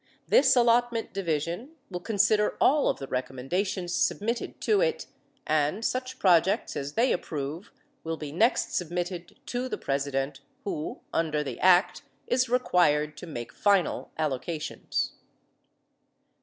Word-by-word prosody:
This 265 -1 +5
Allotment 240 -1 +2
Division 175 - -2 0.2
will 180 - -3
consider 210 +1 +2
all 290 +2 +4
of - - 0
the 135 - -6
recommendations 175 +9 -2
submitted 230 +3 -1
to 420 -2 +3
it - - 0 0.4
and 155 +8 +1
such 255 0 -2
projects 190 +2 +3
as 140 +1 -4
they 240 +8 +3
approve 155 +2 -4 0.3
will 165 0 -3
be 150 -2 -6
next 220 - +2
submitted 175 0 -3
to 250 +1 -3
the - - -3
President 135 0 -2 0.2
who 160 -7 -4
under 155 -2 0
the 140 - -6
Act 180 0 +4 0.2
is 250 0 +1
required 150 -11 +2
to 175 - -8
make 120 -7 -6
final 200 -5 +1
allocations. 155 +1 -2
180 Hz, 130 wpm, -27 LUFS, 150-230 Hz, 0.4 s, This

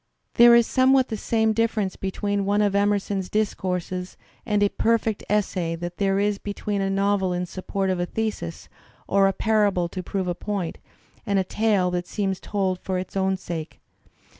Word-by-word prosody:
There 235 0 +8
is 235 -1 +5
somewhat 260 +1 +3
the 220 - -2
same 220 0 +1
dif 230 +1 +1
ference 200 -4 -2
between 200 +1 -1
one 205 +1 +2
of 205 -1 +1
Emerson's 200 -1 0
discourses 185 -3 -2 0.3
and 210 -2 +2
a 205 - +4
perfect 225 -1 0
essay 185 -5 0
that 175 +1 -6
there 195 -1 +1
is 205 0 0
between 205 0 -3
a 195 - 0
novel 195 -1 +1
in 180 0 -1
support 190 +1 -2
of 185 - -1
a 175 - -1
thesis 215 - -4 0.4
or 195 0 +4
a - - +3
parable 205 -4 +1
to 185 - -5
prove 190 +1 -3
a 175 - 0
point, 185 -1 -4 0.4
and 200 -4 0
a 190 - +3
tale 200 -2 +1
that 175 0 -2
seems 195 -3 -2
told 190 -3 -1
for 185 0 -3
its 185 +1 -6
own 190 0 +1
sake. 165 -3 -6
195 Hz, 185 wpm, -24 LUFS, 185-210 Hz, 0.4 s, There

